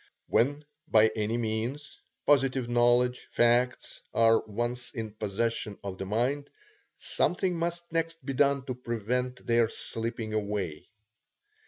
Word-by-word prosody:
When 145 +5 +1 0.2
by 110 -5 +5
any 110 +1 -1
means, 120 +6 -3 0.3
positive 135 -3 +3
knowledge, 120 +1 +3
facts, 120 +1 +1
are 115 0 +5
once 120 +3 -3
in 110 -2 -4
possession 110 0 -2
of 95 -1 -6
the 95 - -4
mind, 130 +7 0 0.5
something 180 0 0
must 170 +1 -2
next 165 -2 -2
be 135 - -2
done 140 0 +2
to 130 - -3
prevent 125 +1 -2
their 115 -1 +3
slipping 115 -1 -3
away. 100 -6 -3
120 Hz, 125 wpm, -29 LUFS, 110-135 Hz, 0.5 s, by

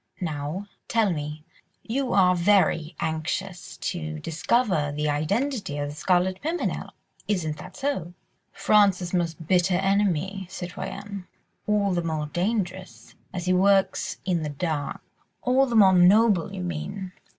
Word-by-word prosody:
Now, 155 +3 -4 0.2
tell 225 -4 +2
me, 150 0 -5 0.4
you 255 +2 -2
are 185 -2 +5
very 170 -3 +2
anxious 170 +4 -3
to 155 -3 -3
discover 165 - 0
the 150 +1 -2
identity 200 - -1
of 145 0 -2
the - - -6
Scarlet 185 +3 +1
Pimpernel, 330 +4 -2 0.3
isn't 160 -7 -1
that - - -11
so?" 230 - -2 0.4
"France's 195 -3 +3
most 165 -3 -1
bitter 180 +1 +3
enemy, 195 -1 0
citoyenne... 190 +1 -6 0.4
all 205 -2 +2
the 175 - +1
more 160 -2 -2
dangerous, 185 +2 -3 0.2
as 180 -1 -4
he 185 - +2
works 195 +1 +2
in 180 -3 +1
the 150 - -3
dark." 145 -1 -3 0.4
"All 260 +2 +3
the 240 - -2
more 195 -4 +7
noble, 190 +1 +5
you 190 -2 -5
mean. 180 +3 -5
180 Hz, 135 wpm, -25 LUFS, 160-200 Hz, 0.4 s, more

